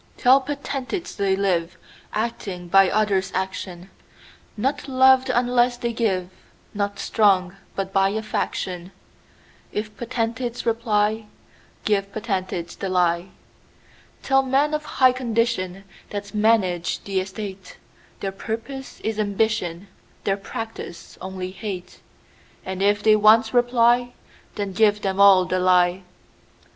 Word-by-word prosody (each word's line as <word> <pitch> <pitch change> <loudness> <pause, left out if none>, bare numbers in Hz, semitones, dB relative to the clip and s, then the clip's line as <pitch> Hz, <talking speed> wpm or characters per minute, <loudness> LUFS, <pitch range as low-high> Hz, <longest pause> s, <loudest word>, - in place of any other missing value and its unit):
Tell 260 +2 +5
potentates, 280 +4 -4
they 195 -2 +1
liveActing 185 +1 -3
by 195 -1 +6
others' 195 -2 +1
action; 190 -1 -4 0.7
Not 275 +6 -1
loved 260 0 +5
unless 245 0 +2
they 235 -1 -2
give, 190 -6 -1 0.4
Not 200 0 -2
strong, 195 -4 +2 0.2
but 195 0 -3
by 195 0 +4
a 220 +2 -3
faction:If 195 +2 -6
potentates 235 0 -3
reply, 220 -2 +1 0.6
Give 200 -2 +1
potentates 185 -5 -3
the 195 - -4
lie. 175 -1 +1 1.0
Tell 270 0 +4
men 270 +3 +1
of 305 0 -2
high 255 -3 +4
condition, 230 -6 -1 0.3
That 205 -1 -6
manage 210 -5 +1
the 195 -1 -1
estate, 190 0 -7 0.4
Their 195 - -2
purpose 230 +7 -6
is 220 -1 -2
ambition, 200 -3 -1 0.4
Their 195 - +1
practice 200 -4 -7
only 185 -1 -5
hate:And 190 -1 -9
if 205 +1 +2
they 215 -1 +6
once 220 +2 +5
reply, 245 0 +3 0.4
Then 200 -2 -3
give 210 0 +3
them 195 0 -1
all 195 -2 +7
the 185 +1 -1
lie. 180 0 +3
205 Hz, 115 wpm, -23 LUFS, 190-235 Hz, 1.0 s, all